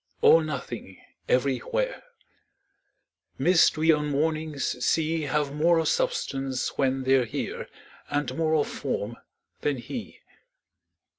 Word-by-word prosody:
All 165 - +8
nothing 125 -10 -6 0.3
everywhere: 140 - 0 1.4
Mists 165 +3 +4
we 160 +1 +4
on 150 -1 +1
mornings 155 -3 -1
see 160 0 +1
Have 145 0 0
more 165 +3 +3
of 165 - +1
substance 135 - -1
when 135 -1 +1
they're 130 -1 +3
here 110 - -4 0.4
And 145 -3 -1
more 160 0 +1
of 150 - +2
form 120 -4 -4 0.4
than 145 -2 0
he. 120 - -7
145 Hz, 115 wpm, -26 LUFS, 130-160 Hz, 1.4 s, All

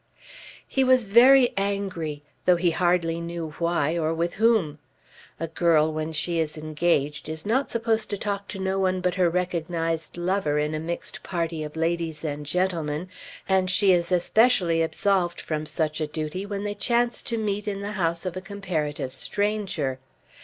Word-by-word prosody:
He 270 - +1
was 255 -2 +4
very 245 +5 +6
angry, 190 -7 -2 0.2
though 180 - +6
he 175 0 +2
hardly 170 -1 +1
knew 170 -2 -5
why 170 -2 +1
or 160 0 0
with 170 +1 -1
whom. 210 -10 +2 0.6
A 165 - -1
girl 160 -1 +2
when 155 +1 -3
she 165 +2 -1
is 160 0 -2
engaged 155 -1 0
is 160 0 -6
not 255 +6 +1
supposed 225 -1 0
to 205 - -2
talk 200 -1 -3
to - - -6
no 190 0 -1
one 185 -1 +1
but 180 0 0
her 180 -2 +3
recognised 165 -2 -2
lover 175 -4 0
in 150 +1 0
a 155 - -2
mixed 170 +2 -5
party 170 -3 -3
of 150 0 -7
ladies 165 -1 -1
and 145 -1 -4
gentlemen, 170 -1 -1 0.4
and 190 -1 +2
she 195 +1 +4
is 175 0 0
especially 180 -2 +3
absolved 175 +1 +1
from 155 -1 -3
such 155 -1 -1
a 155 - 0
duty 155 +6 -4
when 200 -1 -4
they 205 0 -2
chance 235 +3 +1
to 230 - -3
meet 210 -1 -2
in 200 -1 -2
the 205 +1 -4
house 170 -3 -1
of 185 -1 -3
a 185 - -4
comparative 170 -9 -3
stranger. 200 -11 -1
175 Hz, 175 wpm, -25 LUFS, 160-200 Hz, 0.6 s, very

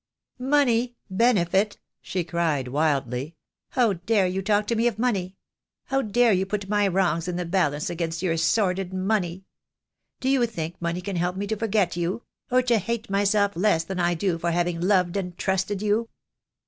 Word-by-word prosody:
"Money, 250 -3 +2 0.2
benefit," 200 -2 +2 0.2
she 185 -2 -2
cried, 160 -5 -1
wildly. 140 0 -1 0.3
"How 240 -5 +2
dare 195 +3 +1
you 185 +1 -1
talk 205 +1 +1
to 235 - -1
me 230 +2 +2
of 235 - -1
money? 195 -6 -1 0.5
How 270 -1 0
dare 230 0 +3
you 190 0 +2
put 200 -1 -3
my 205 0 +2
wrongs 175 -3 +1
in 180 - -2
the 180 0 -2
balance 160 -5 0
against 165 0 -3
your 170 -3 +1
sordid 185 +2 +1
money? 185 -2 -1 0.7
Do 260 - -3
you 265 -3 +3
think 170 -7 -6
money 170 +1 -2
can 190 0 -4
help 180 +1 0
me 200 +2 -3
to 220 +2 -2
forget 205 -5 0
you 175 +6 -2
— - - -55
or 255 0 +4
to 240 -3 +3
hate 230 +2 -4
myself 200 +1 +2
less 180 -3 +2
than 185 +2 -5
I 175 0 +2
do 170 0 -1
for 170 - -1
having 170 0 0
loved 185 -1 +2
and 180 -3 -4
trusted 190 +1 -1
you?" 215 +2 +1
190 Hz, 185 wpm, -25 LUFS, 175-215 Hz, 0.7 s, or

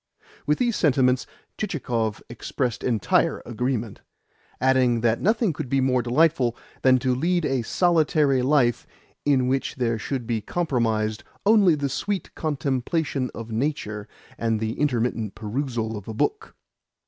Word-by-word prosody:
With 150 - +3
these 240 -3 +1
sentiments 130 -4 +2 0.3
Chichikov 120 - -2
expressed 120 0 -3
entire 115 -7 +1
agreement: 120 -2 -3 0.6
adding 130 -2 +3
that 115 0 +1
nothing 215 -2 +2
could 150 -3 -5
be 135 - +2
more 130 -1 +2
delightful 125 -1 +2 0.2
than 130 -1 +5
to 130 0 0
lead 170 +6 +1
a 135 -2 0
solitary 155 -1 +2
life 125 -3 +2 0.4
in 135 -3 +3
which 135 +3 -1
there 115 -4 0
should 130 +2 -3
be 115 -2 -1
comprised 115 -9 -1 0.2
only 200 -6 +5
the 145 -1 -1
sweet 190 +7 -3
contemplation 140 -1 -1
of 115 0 -7
nature 110 -4 -2 0.3
and 115 -1 0
the 110 0 -2
intermittent 120 -6 0
perusal 115 0 -3
of 105 -2 -8
a 110 - -5
book. 420 - -1
130 Hz, 135 wpm, -24 LUFS, 115-150 Hz, 0.6 s, than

